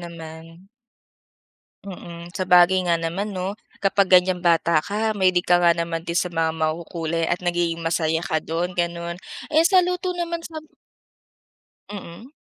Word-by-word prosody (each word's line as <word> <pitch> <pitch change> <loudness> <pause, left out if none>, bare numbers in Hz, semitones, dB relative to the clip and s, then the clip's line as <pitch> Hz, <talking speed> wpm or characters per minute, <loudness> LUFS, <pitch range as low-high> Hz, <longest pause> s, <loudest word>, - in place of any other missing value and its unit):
naman. 165 +1 -11 1.2
Mm. 175 -2 -9
Sabagay 185 -1 +4
nga 170 - +4
naman 185 +5 -3
'no. 185 +2 -2 0.3
Kapag 195 0 +3
ganiyang 180 0 +4
bata 170 -2 +3
ka 215 +5 -1
mahilig 185 -3 +2
ka 175 0 +4
nga 170 -1 +4
naman 170 -1 -2
din 170 - -2
sa 180 0 0
mga 165 -1 +1
makukulay 165 +1 -2
at 180 +1 -2
nagiging 170 -1 -1
masaya 165 0 0
ka 160 -3 -1
do'n, 170 +3 -3
gano'n. 170 0 -3 0.3
Eh, 315 - +5
sa 370 -2 +5
luto 360 0 -2
naman 340 -1 -3
sa 330 -1 -10
b - - -21 1.2
Mm. 205 +4 -9
175 Hz, 150 wpm, -23 LUFS, 165-190 Hz, 1.2 s, Eh